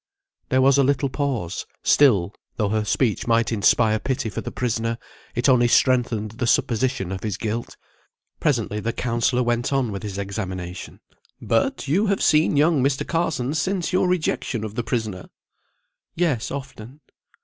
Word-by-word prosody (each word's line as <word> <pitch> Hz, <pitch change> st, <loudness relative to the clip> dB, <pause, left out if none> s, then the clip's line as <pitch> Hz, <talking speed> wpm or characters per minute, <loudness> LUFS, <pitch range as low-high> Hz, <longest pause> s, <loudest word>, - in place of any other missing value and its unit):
There 130 Hz, 0 st, +3 dB
was 135 Hz, +1 st, +5 dB
a -, -, +5 dB
little 140 Hz, +1 st, +1 dB
pause; 130 Hz, -, -3 dB, 0.2 s
still, 105 Hz, -10 st, +4 dB, 0.2 s
though 105 Hz, -3 st, 0 dB
her 110 Hz, 0 st, 0 dB
speech 110 Hz, +1 st, 0 dB
might 115 Hz, 0 st, +2 dB
inspire 110 Hz, 0 st, +3 dB
pity 125 Hz, -4 st, -2 dB
for -, -, -4 dB
the -, -, -6 dB
prisoner, 115 Hz, -1 st, -2 dB, 0.4 s
it 120 Hz, +3 st, +1 dB
only 125 Hz, -3 st, +5 dB
strengthened 120 Hz, -4 st, +2 dB
the 120 Hz, +2 st, -3 dB
supposition 120 Hz, -5 st, +1 dB
of 95 Hz, -, -4 dB
his 105 Hz, -3 st, -3 dB
guilt. 115 Hz, +2 st, -4 dB, 0.6 s
Presently 115 Hz, -7 st, 0 dB
the 115 Hz, +2 st, -2 dB
counsellor 120 Hz, +1 st, 0 dB
went 120 Hz, +1 st, 0 dB
on 135 Hz, -5 st, 0 dB
with 100 Hz, -, -5 dB
his 100 Hz, -2 st, -6 dB
examination. 95 Hz, -3 st, -5 dB, 0.4 s
"But -, -, 0 dB
you 190 Hz, +10 st, +2 dB
have 195 Hz, -1 st, 0 dB
seen 155 Hz, -1 st, +3 dB
young 150 Hz, -1 st, +3 dB
Mr. 135 Hz, 0 st, 0 dB
Carson 160 Hz, -6 st, -1 dB
since 180 Hz, +4 st, -1 dB
your 185 Hz, 0 st, +3 dB
rejection 155 Hz, -9 st, -1 dB
of 110 Hz, -2 st, -5 dB
the 120 Hz, -, -2 dB
prisoner?" 110 Hz, -6 st, -3 dB, 0.9 s
"Yes, 155 Hz, -10 st, 0 dB
often." 135 Hz, 0 st, -8 dB
120 Hz, 160 wpm, -23 LUFS, 110-140 Hz, 0.9 s, was